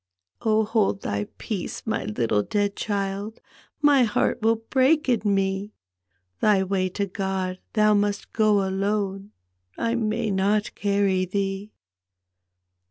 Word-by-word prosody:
" 90 Hz, -, -62 dB
Oh, 220 Hz, -1 st, +2 dB
hold 210 Hz, -3 st, +1 dB
thy 100 Hz, 0 st, -2 dB
peace, 205 Hz, -6 st, -5 dB
my 220 Hz, -, -2 dB
litde 105 Hz, -1 st, 0 dB
dead 205 Hz, -1 st, 0 dB
child. 200 Hz, +1 st, -3 dB, 0.4 s
My 290 Hz, -2 st, +6 dB
heart 230 Hz, +1 st, +1 dB
will 225 Hz, +1 st, +3 dB
break 265 Hz, +7 st, +2 dB
in 240 Hz, -4 st, +2 dB
me! 195 Hz, 0 st, 0 dB, 0.7 s
Thy 205 Hz, -3 st, +3 dB
way 185 Hz, -1 st, 0 dB
to 200 Hz, +2 st, -2 dB
God 190 Hz, -1 st, -3 dB
thou 215 Hz, -1 st, +4 dB
must 205 Hz, 0 st, 0 dB
go 210 Hz, -3 st, +3 dB
alone, 195 Hz, 0 st, -1 dB, 0.5 s
I 230 Hz, 0 st, 0 dB
may 225 Hz, -1 st, -1 dB
not 200 Hz, +2 st, +1 dB
carry 200 Hz, -2 st, +1 dB
thee 195 Hz, +2 st, -3 dB
205 Hz, 130 wpm, -24 LUFS, 195-215 Hz, 0.7 s, My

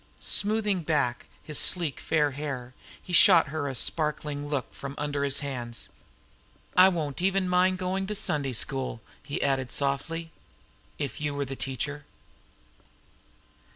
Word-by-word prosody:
Smoothing 210 Hz, -2 st, +1 dB
back 145 Hz, -7 st, 0 dB, 0.2 s
his 150 Hz, -, -1 dB
sleek 170 Hz, -7 st, +2 dB
fair 150 Hz, -2 st, +1 dB
hair, 130 Hz, -3 st, -5 dB, 0.3 s
he 180 Hz, -, -9 dB
shot 170 Hz, -4 st, +7 dB
her 145 Hz, -1 st, -3 dB
a 135 Hz, -, -4 dB
sparkling 150 Hz, 0 st, 0 dB
look 145 Hz, -2 st, -3 dB
from 140 Hz, 0 st, -7 dB
under 145 Hz, -1 st, -2 dB
his 140 Hz, -1 st, 0 dB
hands. 120 Hz, -4 st, -5 dB, 0.9 s
"I 185 Hz, +1 st, +8 dB
won't," 155 Hz, -6 st, -3 dB
he 185 Hz, -, +3 dB
added -, -, +2 dB
softly, 195 Hz, -, +2 dB
"even -, -, -2 dB
mind 185 Hz, +1 st, +3 dB
going 190 Hz, +1 st, -2 dB
to 210 Hz, -, -3 dB
Sunday 140 Hz, -8 st, 0 dB
School, 130 Hz, 0 st, 0 dB, 0.3 s
if 140 Hz, +1 st, -3 dB
you 150 Hz, -1 st, -2 dB
were 140 Hz, 0 st, -1 dB
the 135 Hz, +1 st, -6 dB
teacher." 140 Hz, +3 st, -4 dB
145 Hz, 140 wpm, -27 LUFS, 135-170 Hz, 0.9 s, I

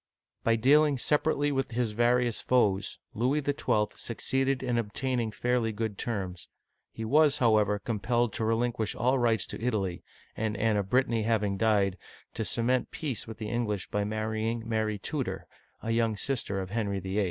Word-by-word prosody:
By 115 Hz, -, +3 dB
dealing 145 Hz, +5 st, +4 dB
separately 145 Hz, +2 st, +1 dB
with 135 Hz, -3 st, -1 dB
his 120 Hz, -2 st, 0 dB
various 120 Hz, +1 st, +2 dB
foes, 105 Hz, -6 st, +1 dB, 0.2 s
Louis 130 Hz, +7 st, +1 dB
XII. 140 Hz, -7 st, +1 dB
succeeded 135 Hz, +3 st, -1 dB
in 120 Hz, -2 st, +1 dB
obtaining 115 Hz, +1 st, -1 dB
fairly 120 Hz, +1 st, 0 dB
good 110 Hz, -1 st, -4 dB
terms. 95 Hz, -6 st, -4 dB, 0.4 s
He 110 Hz, -, -6 dB
was, 150 Hz, +4 st, +4 dB
how 115 Hz, -3 st, +4 dB
ever, 105 Hz, -1 st, +2 dB
compelled 120 Hz, +2 st, 0 dB
to -, -, -2 dB
relinquish 115 Hz, -1 st, 0 dB
all 130 Hz, +3 st, +2 dB
rights 115 Hz, -5 st, +2 dB
to -, -, -7 dB
Italy, 100 Hz, -7 st, -1 dB, 0.3 s
and 110 Hz, -1 st, -2 dB
Anne 110 Hz, 0 st, +2 dB
of 100 Hz, -1 st, -2 dB
Brittany 120 Hz, -2 st, +2 dB
having 105 Hz, -3 st, +1 dB
died, 100 Hz, -3 st, +2 dB, 0.3 s
to 110 Hz, -, -2 dB
cement 120 Hz, +3 st, +1 dB
peace 140 Hz, -9 st, -4 dB
with 110 Hz, -, -8 dB
the 110 Hz, -1 st, -5 dB
English 105 Hz, -4 st, -2 dB
by 105 Hz, -, 0 dB
marrying 110 Hz, +2 st, -2 dB
Mary 110 Hz, -2 st, 0 dB
Tudor, 135 Hz, +5 st, -3 dB, 0.4 s
a 115 Hz, -, -1 dB
young 115 Hz, -2 st, +1 dB
sister 110 Hz, -5 st, -1 dB
of 95 Hz, -1 st, -5 dB
Henry 100 Hz, -3 st, -1 dB
VIII. 95 Hz, +2 st, -2 dB
115 Hz, 165 wpm, -29 LUFS, 105-125 Hz, 0.4 s, dealing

